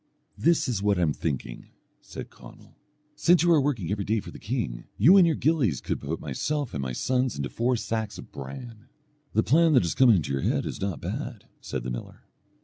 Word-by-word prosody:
"This 170 -1 +2
is 115 -6 -1
what 100 -1 +2
I 90 - +2
am 75 -3 +2
thinking," 65 -7 -4 0.3
said - - -9
Conall, - - -15 0.4
"since 175 +2 +4
you 175 - +4
are 155 - +5
working 120 - -1
every 100 -1 -1
day 110 +3 0
for 95 -3 -9
the - - -11
king, 105 - -3
you 155 - +7
and 185 -3 +7
your 160 - +2
gillies 135 - +1
could - - -3
put 75 +3 -4
myself 140 - -3
and 70 - -3
my 65 -1 -3
sons 125 - 0
into 70 -1 -3
four 125 +2 0
sacks 110 -2 -3
of - - -11
bran." 105 - -9 0.5
"The 110 - +3
plan 160 +4 +4
that 125 - +5
has 85 - -1
come 130 -2 +5
into 85 -11 +3
your 70 - -1
head - - 0
is - - -5
not 95 -8 -3
bad," - - -5 0.2
said 65 - -4
the 60 - -4
miller. - - -7
110 Hz, 220 wpm, -26 LUFS, -, 0.5 s, you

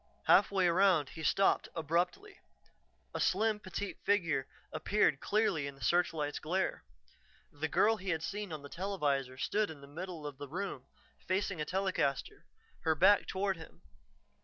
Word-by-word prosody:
Halfway 195 -2 +5
around, 175 -4 +4
he 160 - -9
stopped 195 +5 +2
abruptly; 175 - -1 0.7
a - - -3
slim, 215 +3 +2
petite 200 0 -5
figure 165 -9 +1 0.3
appeared 205 -9 +2
clearly 200 -9 +1
in 140 - -7
the 135 - -12
searchlight's 160 -4 +1
glare. 185 +5 -1 0.7
The 150 +2 -3
girl 220 +8 +3
he 190 0 -6
had 160 -2 0
seen 205 -1 -4
on 155 -2 -6
the - - -7
televisor 145 -8 -1
stood 210 +9 0
in 155 -3 -9
the - - -10
middle 165 +2 -7
of 145 -2 -7
the 145 - -6
room, 175 -6 -5 0.4
facing 185 -2 0
a - - -1
telecaster, 190 - -1 0.3
her 160 -1 +1
back 205 +7 +5
toward 195 -1 -1
him. 160 - -13
175 Hz, 155 wpm, -33 LUFS, 150-195 Hz, 0.7 s, Halfway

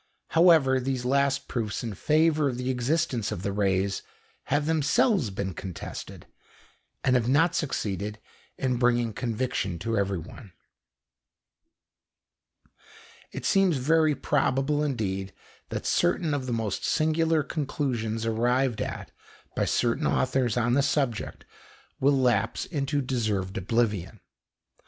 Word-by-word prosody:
However, 160 -6 +5
these 130 -1 -2
last 140 +1 +1
proofs 110 -3 -3
in 115 -3 -4
favour 155 - +2
of 125 - -4
the 125 +1 -1
existence 125 -3 0
of 100 -3 -5
the 100 - -1
rays 95 -1 0 0.4
have 145 +1 0
themselves 160 - +2
been 95 -1 -4
contested, 90 +1 -8 0.8
and 130 - +3
have 120 -1 +1
not 160 +6 +4
succeeded 105 - -2 0.4
in 130 -2 0
bringing 120 -2 +2
conviction 115 -6 -2
to 115 +7 -2
everyone. 95 +1 -4 2.8
It - - -6
seems 195 -6 +3
very 155 +3 +3
probable 145 +1 +1
indeed 100 -9 -2 0.4
that - - -4
certain 175 -3 +1
of 135 -3 -2
the - - -2
most 110 -4 -2
singular 160 0 +2
conclusions 125 -7 -2
arrived 120 +1 +1
at - - -5 0.4
by - - +1
certain 125 +6 +1
authors 130 -3 +1
on 120 0 +2
the 140 - +4
subject 135 -6 -1 0.5
will 140 +1 +3
lapse 120 -4 +1
into 145 -2 -1
deserved 110 -7 -1
oblivion. 105 -1 -1
125 Hz, 120 wpm, -27 LUFS, 110-145 Hz, 2.8 s, However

